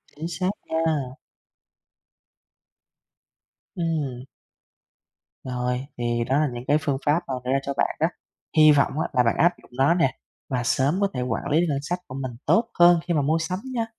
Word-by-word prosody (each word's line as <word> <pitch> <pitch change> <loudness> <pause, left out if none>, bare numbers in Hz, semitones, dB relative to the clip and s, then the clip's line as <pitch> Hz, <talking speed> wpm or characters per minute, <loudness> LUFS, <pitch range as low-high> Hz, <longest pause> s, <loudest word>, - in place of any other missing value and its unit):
Chính 155 +3 -5
xác 180 +2 -1 0.2
nha. 160 -1 +1 2.8
Ừm. 150 -8 -2 1.2
Rồi, 125 0 -2
thì 120 0 0
đó 135 +4 +1
là 155 - +2
những 120 0 -6
cái 145 - +4
phương 140 -2 0
pháp 150 +3 +3
mà 135 - -3
đưa 125 - -2
ra 135 - +3
cho 140 - -3
bạn - - +1
đó. 160 - +3 0.5
Hy 155 0 +8
vọng 145 +1 +2
á - - 0
là 125 -2 +4
bạn 115 - +1
áp 175 +1 +4
dụng - - -21
nó 135 +5 +4
nè 165 -7 +1 0.3
và 125 -2 -1
sớm 135 +8 +1
có 200 - +4
thể 125 - -2
quản 125 -2 -2
lý 155 +3 +3
được - - +2
ngân 140 - 0
sách 175 +5 -3
của 130 - -8
mình 130 -2 -4
tốt 230 +1 +3
hơn 175 -1 +7
khi 175 - +1
mà 150 - +2
mua 155 +4 +2
sắm 180 +4 -3
nha. 230 -2 0
145 Hz, 195 wpm, -24 LUFS, 130-165 Hz, 2.8 s, Hy